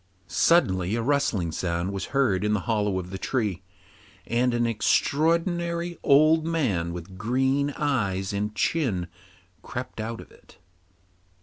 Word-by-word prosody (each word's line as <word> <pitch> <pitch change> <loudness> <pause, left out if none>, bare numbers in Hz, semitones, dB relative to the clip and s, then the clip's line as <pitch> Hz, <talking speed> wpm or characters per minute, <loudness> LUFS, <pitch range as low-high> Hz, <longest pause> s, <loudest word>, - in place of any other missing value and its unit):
Suddenly 95 - +2
a 115 - -1
rustling 120 - +1
sound 85 +3 -2
was 100 - -3
heard 120 -9 +1
in 105 0 +1
the 105 - 0
hollow 105 -3 0
of 90 0 -5
the 95 - -5
tree, 105 -8 -1 0.6
and 125 +2 +1
an 120 0 +1
extraordinary 170 - +1
old 155 +3 +5
man 125 - 0
with 90 +2 -8
green 130 +6 +1
eyes 100 -9 -1
and 105 +1 -2
chin 110 - 0 0.6
crept 120 -1 -6
out 115 +1 -4
of - - -12
it. - - -20
115 Hz, 135 wpm, -26 LUFS, 95-140 Hz, 0.6 s, old